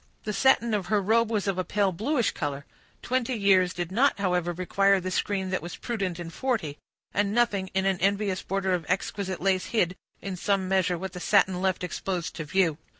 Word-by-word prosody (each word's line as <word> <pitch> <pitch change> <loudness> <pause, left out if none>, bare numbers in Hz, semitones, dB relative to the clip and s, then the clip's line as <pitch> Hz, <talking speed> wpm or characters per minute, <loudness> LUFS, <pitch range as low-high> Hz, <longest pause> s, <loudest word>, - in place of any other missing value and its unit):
The 210 - -3
satin 235 0 +3
of 200 -4 -1
her 210 +1 +2
robe 220 +3 +2
was 210 -3 -1
of 190 -2 0
a - - +1
pale 200 0 +1
bluish 235 - 0
color. 145 -2 -4 0.4
Twenty 255 0 0
years 190 -4 +4
did 175 -1 -4
not, 260 +8 +3
however, 180 -3 0
require 195 +3 +2
the 185 0 -4
screen 190 0 -1
that 190 - -1
was 175 +2 -7
prudent 195 -7 -3
in 170 -1 -6
forty, 200 - -2 0.3
and 205 0 +1
nothing 205 -6 +1
but 190 0 0
an 190 -1 +1
envious 200 -1 +1
border 190 -1 -1
of 175 -2 -1
exquisite 190 0 -2
lace 190 -1 +1
hid, 185 -6 0 0.2
in 195 -2 -5
some 195 0 0
measure, 185 -2 +1
what 190 +2 -6
the 180 - -6
satin 190 -1 +3
left 185 -1 0
exposed 180 -1 -3
to 160 - -4
view. 165 -1 +1
190 Hz, 205 wpm, -27 LUFS, 180-205 Hz, 0.4 s, years